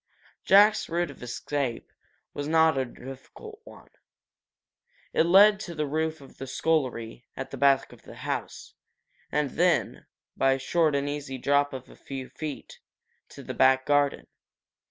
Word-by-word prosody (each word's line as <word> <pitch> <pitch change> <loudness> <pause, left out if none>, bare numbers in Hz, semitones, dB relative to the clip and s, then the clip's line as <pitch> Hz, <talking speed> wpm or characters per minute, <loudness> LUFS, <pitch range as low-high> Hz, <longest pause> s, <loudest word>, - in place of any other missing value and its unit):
Jack's 205 +2 +5
route 170 -2 -1
of 140 - -16
escape 125 +1 -4 0.4
was 145 0 -4
not 160 0 +4
a 135 -1 0
difficult 135 - -11
one. - - -15 1.2
It 165 - +3
led 200 +3 +7
to 170 - -7
the 155 -1 -1
roof 160 +1 -2
of 135 - -16
the 135 - -6
scullery, 130 -5 -2
at 130 - -6
the - - -6
back 140 -1 +3
of - - -17
the - - -13
house, - - -5 0.6
and 145 -2 0
then, 175 -1 0 0.3
by 135 0 +3
a - - -1
short 155 +2 +1
and 140 0 -1
easy 145 -2 -5
drop 145 +2 +1
of 130 -2 -8
a - - -16
few 135 -2 -8
feet, 155 -3 -8 0.5
to - - -12
the - - -6
back 130 0 +3
garden. 145 -1 +1
145 Hz, 155 wpm, -27 LUFS, 135-160 Hz, 1.2 s, led